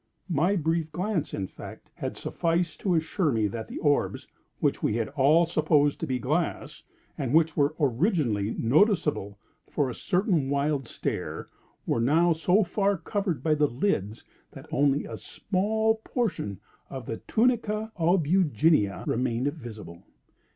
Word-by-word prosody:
My 175 +6 +2
brief 160 -2 -1
glance, 185 -2 -2
in 95 - -3
fact, - - -11
had - - -5
sufficed 170 0 -1
to 185 -4 +1
assure 160 0 0
me 110 -3 +1
that 110 +2 -4
the - - -7
orbs 145 -2 0 0.3
which - - 0
we - - 0
had 115 -1 -1
all 145 +4 +4
supposed 155 -3 +2
to - - -3
be 130 - 0
glass, 150 +7 -2 0.4
and 135 0 0
which 160 -1 +3
were 145 +1 +2
originally 130 - +1
noticeable 150 - +2 0.3
for 140 -4 0
a - - -5
certain 180 - 0
wild 140 -2 0
stare, - - -4 0.4
were 115 - 0
now 165 +8 +4
so 180 +6 +3
far 200 +2 0
covered 180 - -2
by 155 - +3
the 150 -1 +3
lids, 115 - -2 0.3
that - - -11
only 140 +1 +2
a - - -7
small 220 +3 -1
portion 180 - -2 0.3
of 130 -3 -7
the 115 - -4
tunica 220 -2 +1
albuginea 160 - +2
remained 125 +3 0
visible. 105 - -10
155 Hz, 145 wpm, -27 LUFS, 130-180 Hz, 0.4 s, all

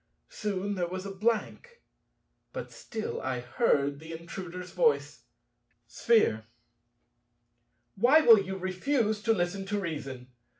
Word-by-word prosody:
Soon 205 -1 -3
there 180 -3 -1
was 185 +2 -5
a 200 - -5
blank. 235 - -2 0.7
But - - -6
still 220 -2 -5
I 130 -1 -2
heard 140 - +1
the 160 +1 -9
Intruder's 180 +2 -7
voice. 470 -2 +1 0.6
Sphere. 160 - +2 1.5
Why 265 +10 +5
will 230 -7 +8
you 190 0 -5
refuse 210 +4 0
to 225 +2 +2
listen 195 -1 0
to 205 +1 -1
reason? 140 -8 -5
190 Hz, 120 wpm, -29 LUFS, 170-225 Hz, 1.5 s, will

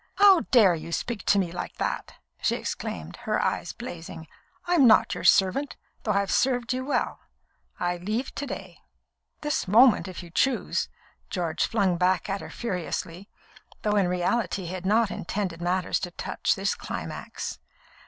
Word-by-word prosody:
"How 395 -3 +7
dare 215 -8 +6
you 165 0 -6
speak 220 +3 -3
to 200 - +5
me 185 -4 +1
like 175 - -5
that!" - - -3 0.3
she - - +2
exclaimed, - - -5
her - - -1
eyes - - -1
blazing. 175 -7 -8 0.4
"I'm 345 -7 +5
not 220 - +5
your - - -5
servant, 200 +10 +3 0.3
though 215 - -1
I 200 - +3
have 200 - -3
served 245 +3 +2
you 255 +1 -2
well. 280 - -1 0.6
I 175 0 0
leave 215 +9 -3
to 285 - -4
day." - - -7 0.6
"This 295 -7 -1
moment, 225 +2 +6
if 185 -1 -7
you 170 - -12
choose," 265 +8 +1 0.4
George 170 -4 -1
flung 195 -6 +1
back 185 +2 +1
at 195 - -2
her - - -8
furiously, 185 -3 -4 0.5
though 210 -1 +1
in 200 -3 +3
reality 180 +3 0
he 175 +1 -5
had 185 0 -4
not 220 +1 +3
intended 180 -2 -3
matters 180 +1 0
to 180 - -4
touch 175 - -1
this 195 +1 0
climax. - - -6
195 Hz, 165 wpm, -26 LUFS, 180-235 Hz, 0.6 s, How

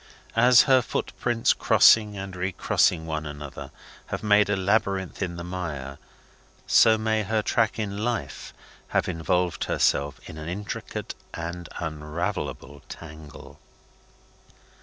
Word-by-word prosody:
As 120 +1 +7
her 130 -3 +5
footprints 120 0 0
crossing 105 -2 +5
and 95 -1 -6
recrossing 90 -1 +1
one 80 -1 -3
another 75 -1 -8 0.4
have - - -5
made 105 -1 +4
a 105 - +2
labyrinth 100 -1 0
in 90 -3 -2
the 85 - -6
mire, 80 -7 -5 0.7
so 110 -1 +5
may 110 0 0
her 110 +1 -1
track 115 +1 +1
in 100 -2 -3
life 110 - -3 0.4
have - - 0
involved 85 +1 -1
itself 70 0 +1
in 80 - -9
an 80 +2 -6
intricate 100 +3 -5 0.2
and 85 +1 -6
unravellable 75 -3 -4
tangle. 75 -2 -11
90 Hz, 120 wpm, -25 LUFS, 80-105 Hz, 0.7 s, As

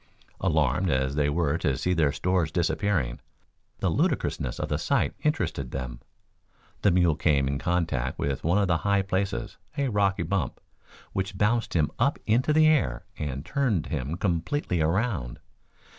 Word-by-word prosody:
Alarmed 80 0 +1
as 65 -1 +1
they 75 0 +1
were 80 0 +1
to 70 -4 0
see 90 - 0
their 80 -5 +3
stores 90 0 0
disappearing, 85 - 0 0.6
the - - +2
ludicrousness - - 0
of - - -2
the - - -1
sight - - +1
interested 85 - -1
them. 65 -2 -5 0.8
The 105 - +4
mule 85 -3 +3
came 75 -4 +2
in 70 0 -1
contact 80 -7 -1
with 70 -1 -2
one 85 +5 +2
of 100 -1 +2
the 85 -2 +2
high 100 +3 +1
places 95 +1 -2 0.2
a 140 -2 +1
rocky 100 -4 +1
bump, 95 +2 -2 0.5
which 95 0 -2
bounced 115 +2 +1
him 75 -3 +2
up 140 +5 +2
into 120 +7 +2
the 155 +1 +5
air 145 - +2
and 70 -1 -4
turned 120 - 0
him 75 +1 -3
completely 90 - -1
around. 85 - 0
85 Hz, 160 wpm, -27 LUFS, 70-100 Hz, 0.8 s, the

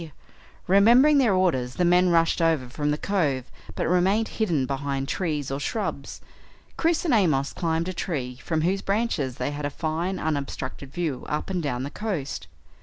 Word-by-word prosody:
Remembering 240 +10 +6
their 230 -8 +3
orders 130 -10 +1
the 180 - +1
men 180 +1 +4
rushed 165 0 +3
over 160 -6 +2
from 145 +4 -2
the 150 - +1
cove 150 -10 -1 0.2
but - - -1
remained 190 +5 +2
hidden 170 - 0
behind 135 0 -2
trees 150 -7 -2
or 135 - -2
shrubs. 215 +9 -4 0.5
Chris 330 +1 +1
and 310 - +2
Amos 155 - +2
climbed 165 -1 -1
a 185 - -3
tree 130 -9 -3
from 160 -2 -1
whose 190 +3 +1
branches 195 - -1
they 145 - -2
had 145 0 -5
a 145 - 0
fine 165 +5 -2
unobstructed 140 -3 -4
view 155 -6 -3
up 150 +5 -2
and 180 -2 -1
down 125 -5 -2
the 140 - -5
coast. 160 - -4
165 Hz, 175 wpm, -25 LUFS, 140-190 Hz, 0.5 s, Remembering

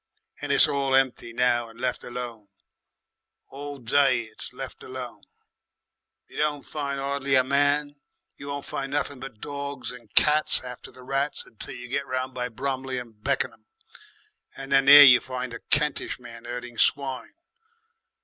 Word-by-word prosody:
"And - - -3
it's - - +6
all 135 -1 +1
empty 130 -3 +1
now 120 -1 +1
and 115 +1 -16
left 125 0 -2
alone. 120 -4 -7 1.0
All 145 +1 -7
day 130 0 +2
it's 110 -1 -9
left 130 +1 -8
alone. 130 -1 -8 1.1
You - - -14
don't 150 -1 0
find 140 -2 -4
'ardly 140 0 0
a 130 - +5
man, 145 +2 +1 0.4
you 140 - -10
won't 140 0 -5
find 135 0 -4
nothing 145 -2 -1
but 130 -4 -9
dogs 140 -2 -5
and 120 -4 -13
cats 150 0 +5
after 125 -1 -9
the 130 - -15
rats 135 +2 -2
until 110 - -9
you 125 0 -9
get 135 +3 -3
round 130 0 -3
by 125 0 -3
Bromley 130 +1 -3
and 115 -4 -9
Beckenham, 115 -5 -2 0.9
and 135 0 -8
there 140 +1 +10
you 125 -3 +8
find 130 -1 -5
the 115 - -7
Kentish 150 0 0
men 115 -1 -12
herding 120 -1 -7
swine. 135 - 0
130 Hz, 155 wpm, -25 LUFS, 125-140 Hz, 1.1 s, there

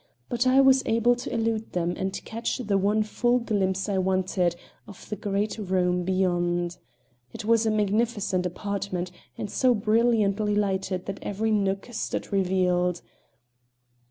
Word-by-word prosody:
But 240 +1 +1
I 260 +1 +5
was 265 0 +6
able 230 +2 +3
to 245 - -6
elude 225 -1 -1
them 175 0 0
and 190 0 -3
catch 230 +1 -3
the 215 -6 -1
one 205 +3 +2
full 240 +3 +1
glimpse 195 -5 -1
I 195 -2 0
wanted 185 -2 +1 0.3
of 200 - -12
the 210 - -2
great 205 +2 -2
room 180 -2 +1
beyond. 175 -1 0 0.6
It 215 - -7
was 230 0 +3
a - - +3
magnificent 210 -3 0
apartment, 185 -1 -4 0.3
and - - -3
so 250 +4 +2
brilliantly 215 -1 +2
lighted 195 -2 -1
that 195 - -5
every 215 +2 -1
nook 195 0 0
stood 220 - -4
revealed. 180 -2 +1
200 Hz, 145 wpm, -26 LUFS, 185-220 Hz, 0.6 s, was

